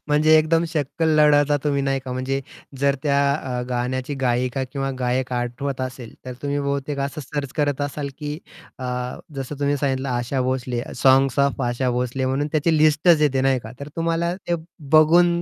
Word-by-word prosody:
म्हणजे 155 +2 +5
एकदम 165 +2 +2
शक्कल 160 +1 -1
लढवता 145 -1 +5
तुम्ही, 140 -1 +1
नाही 135 0 0
का? 130 - -5
म्हणजे 130 +2 -2 0.4
जर 140 0 +3
त्या 140 -2 +2 0.2
अ, 125 -4 -3
गाण्याची 125 +3 -2
गायिका 125 +1 0
किंवा 135 -1 -2
गायक 125 0 -1
आठवत 125 +3 -3
असेल, 125 -2 -6
तर 130 - -5
तुम्ही 145 0 -1
बहुतेक 140 0 -2
असं 140 +2 -3
सर्च 140 0 -5
करत 145 -2 0
असाल, 145 0 -3
की 150 -1 -4 0.4
अ, 130 - -6 0.5
जसं 135 +1 -5
तुम्ही 145 0 +1
सांगितलं 135 -1 -1
आशा 125 +2 -1
भोसले, 125 -1 -2
'साँग्स 135 0 +4
ऑफ 140 0 +2
आशा 125 +1 0
भोसले' 125 +2 -1
म्हणून 135 +3 0
त्याची 160 +1 +2
लिस्टच 155 +2 +4
येते 135 -3 +2
नाही 135 0 +2
का? 110 - -9
तर 140 - -6
तुम्हाला 165 +1 0
ते 175 -2 -3 0.4
बघून 160 +3 +6
140 Hz, 175 wpm, -22 LUFS, 130-150 Hz, 0.5 s, बघून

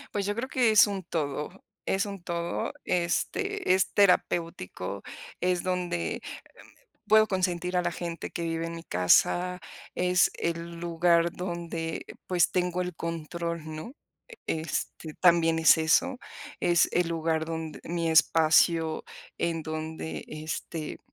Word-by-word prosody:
Pues, 200 -1 0
yo 205 - 0
creo 235 +4 -3
que 245 -4 +3
es 215 0 +7
un 195 -2 -4
todo 150 -3 -2 0.4
es 195 +2 +1
un 200 -3 -7
todo, 170 0 -2
este, 370 - 0
es 190 0 +2
terapéutico, 165 - +1 0.4
es 180 0 +1
donde, 180 -2 -1
em, - - -7 0.9
puedo 215 0 +6
consentir 180 -2 -1
a 180 - +3
la - - -2
gente 170 -1 -5
que 170 - -5
vive 165 0 -2
en 165 - -6
mi 165 - -8
casa, 175 - +3 0.4
es 180 0 +3
el 170 0 -3
lugar 170 0 +2
donde, 170 -2 -4 0.2
pues, 180 -2 +2
tengo 180 0 0
el 180 -1 -3
control, 170 0 -4
¿no?, 160 - -7 0.5
e 160 - -1
este, 160 -1 -4
también 165 -2 +4
es 160 - +7
eso. 160 +11 +2 0.4
Es 175 0 +4
el 175 -1 +2
lugar 160 -1 0
donde 160 -1 -5
mi 170 -1 -1
espacio 160 0 +4 0.3
en 165 -1 -1
donde, 155 0 -5
este, 155 0 -5
170 Hz, 140 wpm, -28 LUFS, 165-180 Hz, 0.9 s, es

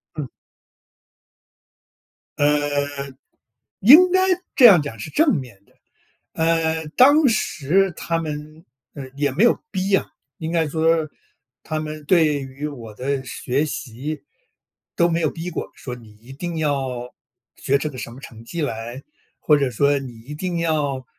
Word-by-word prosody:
嗯。 150 -3 -4 2.1
呃。 145 -1 0 0.7
应 315 - +8
该 375 - +4 0.4
这 260 - +7
样 200 -7 +9
讲 130 -7 -6
是 105 - -6
正 310 - +3
面 125 -9 -6
的。 - - -29 0.6
呃， 160 -1 0
当 285 +3 +6
时 195 - +1
他 165 0 -2
们， 155 0 -6 0.3
呃， 140 -3 -7
也 145 0 +1
没 175 - +3
有 240 - +3
逼 190 +1 -1
啊， - - +2 0.3
应 160 -2 -4
该 165 -1 +1
说， 160 +1 +1 0.6
他 155 - -3
们 155 0 -6
对 160 -3 +4
于 135 +2 -6
我 120 -7 -8
的 135 +4 -2
学 130 +3 -2
习 140 +2 -5 0.7
都 170 0 +3
没 165 0 0
有 155 -3 +1
逼 170 +2 -6
过， - - -5
说 125 - -7
你 115 -3 -14
一 125 +3 -12
定 170 +5 -5
要 135 -5 -2 0.4
学 140 - +1
这 150 +2 -2
个 130 - -10
什 120 - -6
么 - - -13
成 115 -4 -12
绩 165 +7 -4
来， 120 0 -5 0.4
或 150 -1 +4
者 140 -2 0
说 140 +4 +2
你 125 -4 -9
一 135 +6 -9
定 175 +3 -3
要， 150 -5 -1
150 Hz, 165 characters per minute, -22 LUFS, 135-165 Hz, 2.1 s, 样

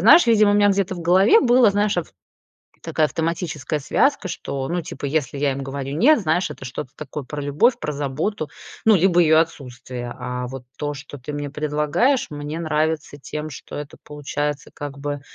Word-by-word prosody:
знаешь, 290 - +7
видимо 215 -3 +5
у - - +3
меня 205 0 +5
где-то 195 -1 0
в 175 - -7
голове 190 - +5
было, 245 -2 +5
знаешь 205 -2 +1
ав 160 - -2 0.8
такая 155 - +2
автоматическая 160 -2 -2
связка, 275 - +1
что, 135 -6 -4
ну, 175 0 -1
типа, 145 - -7
если 140 -2 -1
я 140 -1 +1
им 135 - -5
говорю 135 +1 -4
нет, 255 - +5
знаешь, 175 -2 +1
это 130 - -9
что-то 130 0 -6
такое 150 -1 -6
про 145 +3 -6
любовь, 145 - +2
про 150 - -3
заботу, 150 +4 -2 0.3
ну, 220 -1 +6
либо 175 0 +4
ее 160 -1 +5
отсутствие. 125 -6 -3
А, 125 0 -4
вот 130 -1 -7
то, 145 -1 -2
что 145 0 -9
ты 130 +4 -7
мне 145 -1 -4
предлагаешь 150 - +1
мне 150 +2 -5
нравится 155 -1 -1
тем, 150 +2 -6
что 130 - -9
это 145 0 -7
получается, 145 0 -4
как 145 -1 -7
бы, 145 0 -4
150 Hz, 190 wpm, -22 LUFS, 140-180 Hz, 0.8 s, знаешь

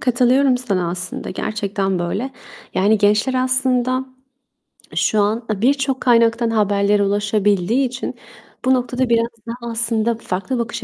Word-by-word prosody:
Katılıyorum 255 +1 +3
sana 190 -8 -1
aslında 180 0 -5
gerçekten 200 -2 -2
böyle. 200 +10 -2 0.4
Yani 205 +3 +3
gençler 210 +5 +2
aslında 255 0 +1 0.9
şu 215 - +1
an, 220 +3 0
aaa, 210 -2 -2
birçok 270 +1 +1
kaynaktan 235 -1 +3
haberlere 205 -1 +2
ulaşabildiği 205 +4 +1
için 250 +2 -5 0.5
bu 260 - +4
noktada 250 0 0
biraz 230 0 +3 0.2
daha 235 0 -6
aslında 230 0 0
farklı 210 +3 -3
bakış 235 -1 -4
230 Hz, 125 wpm, -19 LUFS, 205-250 Hz, 0.9 s, bu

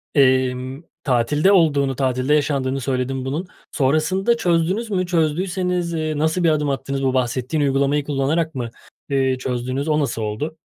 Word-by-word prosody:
emm, 130 0 +2 0.2
tatilde 145 +7 +2
olduğunu, 145 -7 +3
tatilde 130 +1 0
yaşandığını 135 -2 0
söyledin 130 0 -2
bunun. 150 +7 -3 0.2
Sonrasında 160 - +1
çözdünüz 185 +3 0
mü? 185 -2 0
Çözdüyseniz, 175 +1 0
eee, 155 -2 -2
nasıl 160 +4 +1
bir 165 - +5
adım 150 -2 +1
attınız? 135 0 -2
Bu 130 -1 +1
bahsettiğin 130 +4 0
uygulamayı 140 +1 +1
kullanarak 150 +3 -1
mı, 120 -2 -3 0.4
eee, 135 -2 +1
çözdüğünüz? 130 +3 -3
O 155 0 +2
nasıl 135 -5 -1
oldu? 110 +10 -3
145 Hz, 145 wpm, -21 LUFS, 130-160 Hz, 0.4 s, bir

